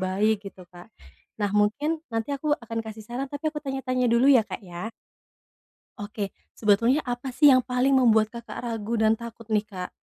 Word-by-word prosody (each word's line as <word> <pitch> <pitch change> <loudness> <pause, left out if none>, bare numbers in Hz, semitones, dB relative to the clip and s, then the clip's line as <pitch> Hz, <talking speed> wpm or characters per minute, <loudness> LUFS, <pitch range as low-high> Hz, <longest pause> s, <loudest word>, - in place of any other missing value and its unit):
baik, 200 +3 +1
gitu 185 -2 -15
Kak. 175 0 -13 0.5
Nah 205 - +1
mungkin 285 +11 +1
nanti 225 +5 -2
aku 295 +2 -1
akan 230 -1 -5
kasih 220 -1 -9
saran, 255 +4 -4
tapi 290 +2 -3
aku 300 - -5
tanya-tanya 260 -2 -1
dulu 235 +2 +3
ya, 250 - +7
Kak, - - -5
ya. 175 +4 -6 1.1
Oke, 205 -1 -5 0.2
sebetulnya 230 +7 +3
apa 245 +2 -3
sih 285 +2 +6
yang 255 - +5
paling 250 +2 +1
membuat 225 -4 +4
Kakak 235 +1 -7
ragu 225 0 -2
dan 220 0 +4
takut 230 0 -8
nih 210 - +4
Kak? 185 -4 -6
230 Hz, 180 wpm, -26 LUFS, 210-260 Hz, 1.1 s, ya